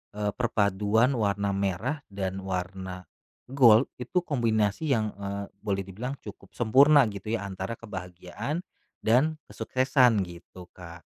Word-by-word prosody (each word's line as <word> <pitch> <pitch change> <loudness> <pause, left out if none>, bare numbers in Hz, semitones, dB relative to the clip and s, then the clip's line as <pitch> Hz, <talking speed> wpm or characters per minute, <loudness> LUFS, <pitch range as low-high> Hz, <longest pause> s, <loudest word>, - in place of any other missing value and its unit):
eee, 105 -1 -1
perpaduan 110 +1 +2
warna 100 -3 0
merah 100 - -1
dan 95 -1 -3
warna 95 0 -4 0.5
gold 125 -3 +6
itu 170 +9 -1
kombinasi 115 - 0
yang, 110 -2 -1
eee, 100 0 -4
boleh 100 -1 -2
dibilang 110 +8 -5
cukup - - -11
sempurna 140 +5 +6
gitu 100 +3 -3
ya 100 - -4
antara 95 +3 -5
kebahagiaan 100 - -6 0.4
dan 140 +8 +3
kesuksesan, 130 -5 +2
gitu, 90 0 -11
Kak. 85 -1 -11
105 Hz, 125 wpm, -27 LUFS, 95-125 Hz, 0.5 s, gold